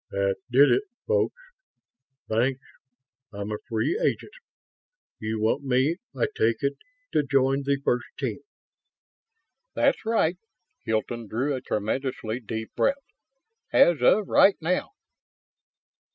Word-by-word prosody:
"That 100 0 0
did 135 +4 +6
it, 395 - +4 0.2
folks. 475 +1 0 0.9
Thanks. 125 +4 +1 0.7
I'm 100 0 -5
a 105 - -3
free 115 - 0
agent. 470 - -1 0.9
You 110 0 -3
want 110 +6 +1
me, 135 +5 +2 0.2
I - - +2
take 115 +4 +1
it, 140 0 +1 0.4
to - - +3
join 135 -1 +2
the 140 0 0
first 120 0 +1
team?" - - -3 1.4
"That's - - +2
right." 200 -6 +1 0.5
Hilton 115 +1 -2
drew 130 +8 -1
a 130 - -3
tremendously 115 +1 -2
deep 110 -1 -6
breath. 275 - +2 0.7
"As 170 -6 +5
of 200 +10 +4
right 195 -1 +5
now." 175 +3 -1
130 Hz, 120 wpm, -26 LUFS, 110-150 Hz, 1.4 s, did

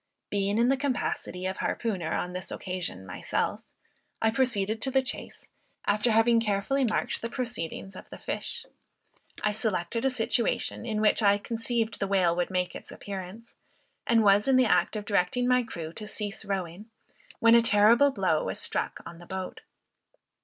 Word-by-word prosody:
Being 200 +1 0
in 235 +2 +4
the 270 - +3
capacity 250 -8 -2
of 190 0 -2
harpooner 185 -9 -2
on 180 - -3
this 180 0 -5
occasion 180 - -4
myself, 95 - -2 0.6
I 220 - +2
proceeded 220 -4 0
to 270 - +3
the 265 0 +2
chase, 260 - -4 0.4
after 210 +3 +2
having 225 +1 +4
carefully 220 +5 0
marked 220 -4 -1
the 230 - -3
proceedings 225 -7 -4
of - - -11
the - - -9
fish. - - -5 0.8
I 210 - +2
selected 215 0 -1
a 270 - +3
situation, 235 -1 0
in 215 -2 -1
which 215 +1 +4
I 205 -1 +5
conceived 225 +1 -2
the 195 - -1
whale 185 -3 +2
would 175 0 0
make 180 -1 -1
its - - -9
appearance, 200 +3 -8 0.5
and 230 -2 +4
was 205 +2 +4
in 265 - +4
the 255 0 +5
act 225 - +2
of 210 -1 -4
directing 205 +5 +1
my 250 0 +4
crew 170 -8 -7
to 210 +2 -6
cease 210 0 -3
rowing, 195 +1 -4 0.5
when 230 0 +6
a 235 - +8
terrible 230 +5 +5
blow 275 - 0
was - - -2
struck - - -2
on 170 - -9
the 175 - -13
boat. 190 -1 -5
210 Hz, 175 wpm, -28 LUFS, 190-235 Hz, 0.8 s, a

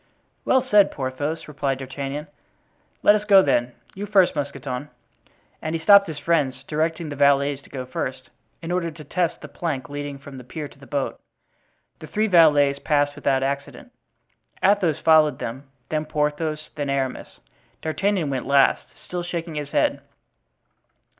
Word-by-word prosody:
"Well 260 -1 +3
said, 210 -6 +5
Porthos," 145 +4 -4
replied 140 -2 -2
D'Artagnan. 135 +2 -5 0.8
"Let 205 - +7
us 210 0 0
go, 200 -2 +6
then. 120 -6 +1 0.2
You 205 +2 -6
first, 190 -5 +4
Mousqueton," 140 -1 -4 0.7
and 155 +1 -3
he - - -1
stopped 200 +4 +7
his 160 -3 -6
friends, 145 -5 0
directing 160 +1 -2
the 145 - -5
valets 140 0 +3
to - - -19
go 130 -2 -6
first, 130 0 -5 0.3
in 165 - -4
order 175 -2 0
to 155 -1 -11
test 170 +3 -1
the - - -8
plank 145 -7 -4
leading 145 -1 -5
from 135 -1 -11
the - - -10
pier 150 +4 -6
to 135 - -20
the 135 - -14
boat. 140 -2 -2 0.8
The 155 - -9
three 215 +7 0
valets 150 -7 +5
passed 145 -1 +1
without 135 -2 0
accident. 140 - -4 0.7
Athos 190 -6 +3
followed 155 -2 +4
them, 130 +4 -6 0.2
then 155 0 -1
Porthos, 150 +1 -2
then 145 -2 -3
Aramis. 135 -2 -3 0.4
D'Artagnan 175 -1 0
went 130 -2 -3
last, 140 0 +4 0.2
still 180 -1 -4
shaking 170 -1 -4
his 150 -1 -4
head. - - +1
150 Hz, 160 wpm, -23 LUFS, 140-165 Hz, 0.8 s, Let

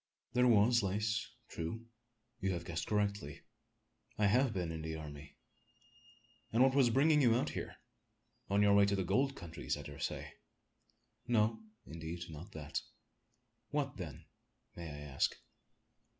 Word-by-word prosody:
"There 125 0 +4
was 120 +1 +5
lace 105 +4 0 0.2
true 85 +8 -5 0.5
you 95 -3 0
have 85 -1 -4
guessed 85 -1 -3
correctly. 100 -8 -1 0.8
I 105 - +3
have 125 +5 +4
been 90 -5 -2
in 80 -1 -4
the 80 0 -4
army." 75 -2 -9 1.2
"And 115 +3 +5
what 135 0 +5
was 135 -3 +5
bringing 150 +5 +4
you 120 -4 +5
out 125 - +1
here? - - -5 0.7
On 100 +1 +4
your 100 0 +6
way 100 0 +6
to 100 - +2
the 95 - 0
gold 135 +9 +2
countries, 85 -7 -4
I - - -7
dare - - -9
say?" - - -4 0.9
"No, 110 -2 +2 0.3
indeed, 85 +2 -6
not 80 +7 -9
that." 75 -2 -3 0.9
"What, - - -1
then, - - -7 0.5
may 85 -2 -6
I 75 0 -7
ask?" 70 -2 0
100 Hz, 150 wpm, -35 LUFS, 80-115 Hz, 1.2 s, your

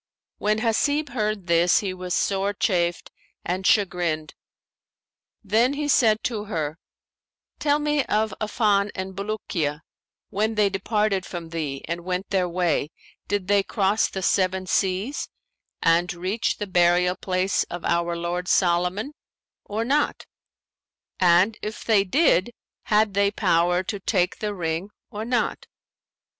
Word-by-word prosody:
When 215 +1 +1
Hasib 285 +6 +1
heard 215 -5 -2
this, 170 +1 +4
he 195 -3 -3
was 180 -1 -3
sore 200 +1 0
chafed 175 -4 0 0.3
and 185 +2 -1
chagrined: 175 -6 +1 1.1
then 225 +6 +2
he 290 +1 -2
said 220 -6 +3
to 215 -4 -2
her, 160 -6 -3 0.8
"Tell 290 -1 +2
me 295 -1 +1
of 215 +1 0
Affan 210 -2 +2
and 190 0 -5
Bulukiya; 185 -7 -3 0.5
when 215 +2 0
they 210 -2 +3
departed 200 0 0
from 170 -4 -7
thee 150 -5 -4
and 170 +1 -4
went 185 +2 -3
their 185 -2 +1
way, 170 -4 0 0.4
did 200 -2 -1
they 200 0 +4
cross 200 +1 +1
the 190 - -5
Seven 185 +1 +1
Seas 190 +8 -1 0.5
and 170 +2 +3
reach 185 +6 -1
the 205 - -3
burial 180 -1 +3
place 185 0 0
of 175 -1 -7
our 170 0 0
lord 175 +1 -3
Solomon 180 +10 +1 0.5
or 220 +2 -2
not; 290 +4 0 0.9
and 185 +4 +4
if 215 +2 -6
they 215 -3 +4
did 235 - +3 0.4
had 210 -1 +2
they 200 +1 +3
power 175 -2 +2
to 200 +2 -4
take 185 -2 0
the 210 -1 -3
ring 165 +2 -3 0.2
or 210 +1 -5
not?" 240 0 -1
195 Hz, 135 wpm, -24 LUFS, 175-215 Hz, 1.1 s, this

